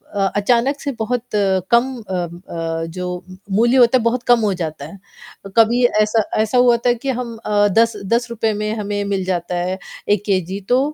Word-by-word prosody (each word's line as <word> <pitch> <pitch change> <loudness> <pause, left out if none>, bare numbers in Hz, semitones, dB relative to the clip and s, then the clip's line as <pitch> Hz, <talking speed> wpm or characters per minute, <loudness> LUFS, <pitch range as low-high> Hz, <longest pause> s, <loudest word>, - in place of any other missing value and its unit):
अ, 195 - +1
अचानक 245 +6 +1
से 280 - -3
बहुत 235 +2 -1
कम 200 +5 +2 0.2
अ 190 - -3 0.4
अ, 165 -1 -3
जो 180 - -3 0.5
मूल्य 235 +6 +3
होता 245 +1 +6
है 235 - -2
बहुत 235 +1 0
कम 240 -1 +5
हो 210 -3 +1
जाता 155 -5 -5
है। 165 +6 -11 0.6
कभी 235 +2 +4 0.2
ऐसा 215 +1 +2 0.2
ऐसा 220 +3 0
हुआ 245 -1 +5
था 245 - +5
कि 265 +3 -5
हम 245 -2 -3
अ, 205 0 +3
दस 230 +3 +2 0.2
दस 240 +1 +1
रुपए 225 -1 -1
में 210 +1 -2
हमें 205 -1 -2
मिल 195 -2 -1
जाता 180 -1 -2
है 180 +2 -2 0.3
1 205 -1 +2
केजी 190 -1 -1
तो 250 +1 +4
215 Hz, 190 wpm, -19 LUFS, 190-240 Hz, 0.6 s, होता